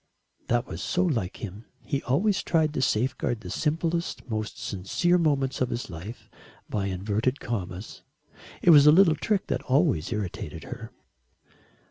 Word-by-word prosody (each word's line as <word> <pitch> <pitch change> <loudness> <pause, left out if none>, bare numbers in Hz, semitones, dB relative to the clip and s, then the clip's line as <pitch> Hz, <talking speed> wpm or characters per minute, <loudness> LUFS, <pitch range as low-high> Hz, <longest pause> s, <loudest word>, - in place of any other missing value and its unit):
That 120 +1 +1
was - - -7
so 180 0 +1
like 115 - -2
him. 105 +2 -7 0.2
He 140 - -1
always 185 - +1
tried 155 -3 +1
to - - -1
safeguard 120 -1 0
the 90 -4 -7
simplest, 165 +2 -1
most 110 -3 -3
sincere 140 - 0
moments 140 -6 +1
of 125 - +2
his 120 -4 -4
life 90 +9 -8 0.4
by 100 -2 -2
inverted 105 +7 -1
commas. 95 -3 -5 0.6
It 175 - +7
was 145 -2 +8
a - - +10
little 165 -1 +6
trick 200 +6 0
that - - -2
always 130 - +1
irritated 105 -5 -4
her. - - -8
130 Hz, 150 wpm, -27 LUFS, 105-155 Hz, 0.6 s, a